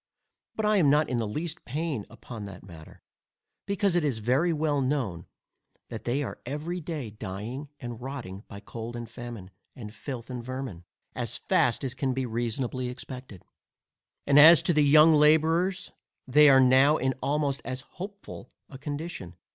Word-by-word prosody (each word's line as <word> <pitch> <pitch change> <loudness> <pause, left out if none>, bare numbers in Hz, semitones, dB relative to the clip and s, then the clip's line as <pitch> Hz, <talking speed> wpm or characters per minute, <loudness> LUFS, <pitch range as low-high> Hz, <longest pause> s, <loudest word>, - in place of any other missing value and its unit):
But 220 - -1
I 210 0 +3
am 160 -7 +4
not 150 +2 +3
in 125 - -1
the 115 -2 -1
least 160 +9 -5
pain 145 -4 -3
upon 115 -4 -9
that 95 -2 -10
matter, 80 -4 -14 0.6
because 200 -2 +1
it 175 - +2
is 140 -6 0
very 130 +10 +1
well 150 -3 0
known, 130 - -2 0.6
that - - -7
they 135 +4 0
are - - -6
every 155 +7 -4
day 150 -8 -5
dying, 110 +7 -6
and 120 -2 -7
rotting, 120 -7 -7
by 100 -2 -10
cold 115 +2 -7
and 120 -1 -6
famine, 120 -7 -9 0.2
and 110 -5 -9
filth, 125 -1 -7
and 125 -1 -5
vermin, 130 -9 -6 0.3
as - - -4
fast 120 +3 +1
as 130 -2 -3
can 130 -1 -2
be 130 -1 -1
reasonably 120 +2 -2
expected. 125 -5 -9 0.8
And 140 +1 +5
as 160 +2 +9
to 175 - +2
the 150 -1 +4
young 155 +3 +7
labourers, 160 +5 +3 0.4
they 150 +3 +7
are 135 -1 +7
now 130 +4 +5
in 130 0 0
almost 140 0 0
as 130 +1 -5
hopeful 195 - -10 0.2
a 135 - -11
condition. 145 - -6
130 Hz, 170 wpm, -27 LUFS, 120-150 Hz, 0.8 s, as